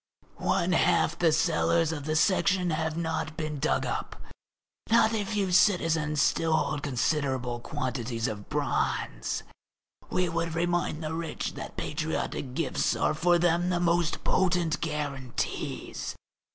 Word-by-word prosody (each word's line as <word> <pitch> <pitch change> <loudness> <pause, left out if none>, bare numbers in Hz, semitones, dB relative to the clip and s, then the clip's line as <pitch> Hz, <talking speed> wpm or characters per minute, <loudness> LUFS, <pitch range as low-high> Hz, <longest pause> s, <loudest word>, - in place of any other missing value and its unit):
One 175 - +1
half 170 -1 +2
the 165 -2 +4
cellars 165 0 +2
of 145 -3 -5
the 155 0 -1
Section 185 0 +3
have 160 0 -1
not 160 -1 -2
been 155 -3 -3
dug 65 - +1
up. - - -3 0.7
Not 230 0 +5
a 215 -2 0
few 200 -2 -1
citizens 165 -6 +3
still 160 +2 +2
hold 150 -2 0
considerable 130 -3 -1
quantities 120 -1 -3
of 105 -3 -6
bronze. - - -1 0.7
We 180 -1 +1
would 165 -1 -2
remind 175 -2 0
the 155 +1 -3
rich 165 0 -3
that - - -8
patriotic 130 -2 -3
gifts 165 -2 0
are - - +1
for 175 +3 +3
them 175 +1 +2
the 175 -1 +1
most 170 -1 +1
potent 175 -3 +1
guarantees. 145 -5 -3
160 Hz, 135 wpm, -28 LUFS, 145-175 Hz, 0.7 s, Not